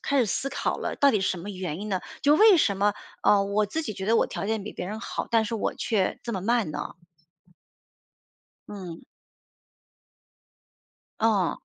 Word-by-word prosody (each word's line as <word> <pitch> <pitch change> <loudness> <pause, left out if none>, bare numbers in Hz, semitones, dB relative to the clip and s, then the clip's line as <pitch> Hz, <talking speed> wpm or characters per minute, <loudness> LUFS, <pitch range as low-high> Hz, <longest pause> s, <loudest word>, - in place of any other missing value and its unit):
开 280 - +1
始 240 - +3
思 270 +7 -1
考 - - -2
了 - - -3
到 280 - +5
底 210 -6 +1
是 - - +1
什 185 - -2
么 190 +5 -6
原 185 -3 -5
因 215 - -5
呢？ 190 -3 -1 0.2
就 290 +2 +5
为 425 -2 +7
什 200 -10 +2
么， 205 +1 +2 0.3
呃， 200 -1 +5
我 205 +1 +1
自 320 +11 -3
己 220 -8 -4
觉 190 0 -6
得 230 - +4
我 - - +3
条 200 - -5
件 220 -2 -1
比 210 - -7
别 180 - -5
人 215 +3 -5
好， - - -4
但 225 -1 +3
是 225 +2 -3
我 220 - -1
却 210 -5 0
这 235 - -4
么 190 - -2
慢 225 -4 +1
呢？ 150 +3 -6 1.7
嗯。 185 -5 -8 2.2
哦。 200 -8 +2
205 Hz, 205 characters per minute, -26 LUFS, 190-230 Hz, 2.2 s, 为